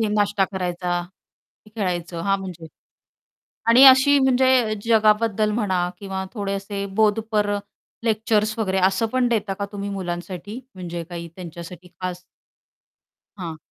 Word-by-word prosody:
हे 220 - +1
नाश्ता 205 -1 +2
करायचा, 180 -1 -2 0.6
की 215 - -18
खेळायचं, 175 -4 -2
हां 195 +2 +1
म्हणजे. 175 -4 -8 1.0
आणि 235 +3 +7
अशी 265 +2 +8
म्हणजे 260 -4 +3
जगाबद्दल 215 -1 +3
म्हणा 190 -5 0
किंवा 190 -1 -4
थोडे 200 -3 -3
असे 200 0 -4
बोधपर 215 -1 +2 0.5
लेक्चर्स 220 -1 +1
वगैरे 190 -3 0
असं 190 +4 0
पण 255 -1 +3
देता 210 -4 0
का 200 - -1
तुम्ही 200 -1 -5
मुलांसाठी, 185 +3 -5 0.2
म्हणजे 175 -2 -5
काही 170 -1 -6
त्यांच्यासाठी 175 0 -9
खास? 180 -1 -4 1.2
हां. 170 -4 -5
200 Hz, 125 wpm, -23 LUFS, 180-220 Hz, 1.2 s, अशी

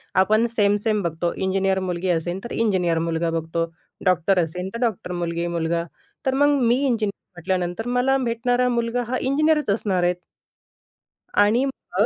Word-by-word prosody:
आपण 215 +4 +4
सेम-सेम 205 0 +2
बघतो, 170 +1 -1
इंजिनिअर 190 0 +1
मुलगी 180 0 -2
असेल 175 +2 -1
तर 235 - -7
इंजिनिअर 185 -7 +1
मुलगा 165 0 -1
बघतो, 165 +1 -2 0.4
डॉक्टर 185 +1 +3
असेल 180 +3 -5
तर - - -4
डॉक्टर 220 -6 -1
मुलगी-मुलगा. 170 -1 -1 0.4
तर 265 - +2
मग 290 +1 +4
मी 240 0 +4
इंजिनिअर 225 -6 +1 0.3
म्हटल्यानंतर 180 +4 -2
मला 270 +2 +3
भेटणारा 245 +2 +1
मुलगा 235 0 0
हा 255 +2 -1
इंजिनिअरच 300 +1 +2
असणार 195 -3 0
आहेत. 175 0 +2 1.2
आणि 210 +5 +4
मग, 210 -7 -1
195 Hz, 145 wpm, -23 LUFS, 175-235 Hz, 1.2 s, आपण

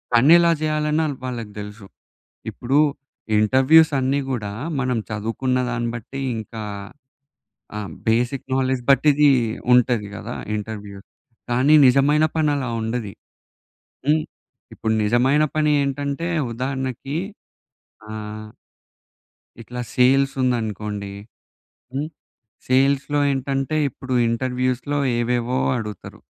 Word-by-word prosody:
పని 130 +6 +6
ఎలా 170 0 +4
చేయాలన్న 155 0 +1 0.2
వాళ్ళకి 120 -4 -5
తెలుసు. 105 0 -9 0.6
ఇప్పుడు 130 +4 0 0.6
ఇంటర్వ్యూస్ 135 +8 +5
అన్నీ 135 +2 +1
కూడా 105 -5 -3 0.3
మనం 125 -2 0
చదువుకున్న 115 +5 -1
దాన్ని 120 -1 -2
బట్టి 125 +4 -7 0.2
ఇంకా 110 0 -7 1.2
ఆహ్, 105 -2 -5 0.2
బేసిక్ 120 +4 +1
నాలెడ్జ్ 130 -1 0
బట్టి 140 +2 +5
ఇది 145 +1 +5 0.4
ఉంటది 120 -4 +3
కదా - - -6 0.2
ఇంటర్వ్యూ. 105 -1 -6 0.5
కానీ 130 +5 +3
నిజమైన 140 +4 +4
పని 155 -2 +2
అలా 130 -3 -2
ఉండది. 110 -2 -3 0.9
హ్మ్. 155 +1 +3 0.5
ఇప్పుడు 110 -1 -1
నిజమైన 130 +7 +3
పని 155 -1 +2
ఏంటంటే 140 +3 -2 0.3
ఉదాహరణకి 130 +2 -3 0.9
ఆహ్... 110 0 -7 1.1
ఇట్లా 125 +2 -6
సేల్స్ 135 +2 +4
ఉందనుకోండి. 105 -5 -2 0.8
హ్మ్. 145 +3 -2 0.6
సేల్స్‌లో 135 +3 +2
ఏంటంటే, 135 +2 -2
ఇప్పుడు 130 +1 -6 0.2
ఇంటర్వ్యూస్‌లో 130 +3 -1 0.2
ఏవేవో 120 +1 0 0.2
అడుగుతారు. 105 -3 -7
130 Hz, 100 wpm, -22 LUFS, 115-140 Hz, 1.2 s, పని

